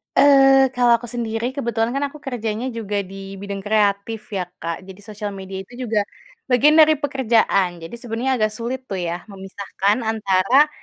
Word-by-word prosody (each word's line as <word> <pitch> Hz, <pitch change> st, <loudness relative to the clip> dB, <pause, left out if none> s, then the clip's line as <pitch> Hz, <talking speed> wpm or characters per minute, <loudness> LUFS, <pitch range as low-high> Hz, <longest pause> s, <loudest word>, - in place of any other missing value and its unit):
Eee, 270 Hz, -1 st, +6 dB
kalau 245 Hz, -1 st, +4 dB
aku 240 Hz, +1 st, -10 dB
sendiri, 230 Hz, -1 st, -3 dB
kebetulan 235 Hz, -3 st, -1 dB
kan 280 Hz, -, 0 dB
aku 290 Hz, -, -12 dB
kerjanya 230 Hz, -3 st, -3 dB
juga 205 Hz, -2 st, -2 dB
di 195 Hz, +1 st, -9 dB
bidang 200 Hz, 0 st, -5 dB
kreatif 210 Hz, +1 st, +1 dB, 0.2 s
ya 185 Hz, -, 0 dB, 0.2 s
Kak, 165 Hz, 0 st, -3 dB
jadi 190 Hz, 0 st, -11 dB
sosial 210 Hz, 0 st, -6 dB
media 190 Hz, 0 st, -7 dB
itu 245 Hz, -, -19 dB
juga 220 Hz, -2 st, +1 dB, 0.5 s
bagian 280 Hz, +5 st, +5 dB
dari 310 Hz, 0 st, +7 dB
pekerjaan. 235 Hz, -9 st, +2 dB
Jadi 165 Hz, +8 st, -8 dB
sebenarnya 240 Hz, +2 st, -2 dB
agak 215 Hz, 0 st, +2 dB
sulit 240 Hz, +3 st, -3 dB
tuh 195 Hz, -, -4 dB
ya 175 Hz, +5 st, -5 dB
memisahkan 195 Hz, +1 st, -2 dB
antara 220 Hz, +6 st, +3 dB
220 Hz, 165 wpm, -21 LUFS, 200-250 Hz, 0.5 s, dari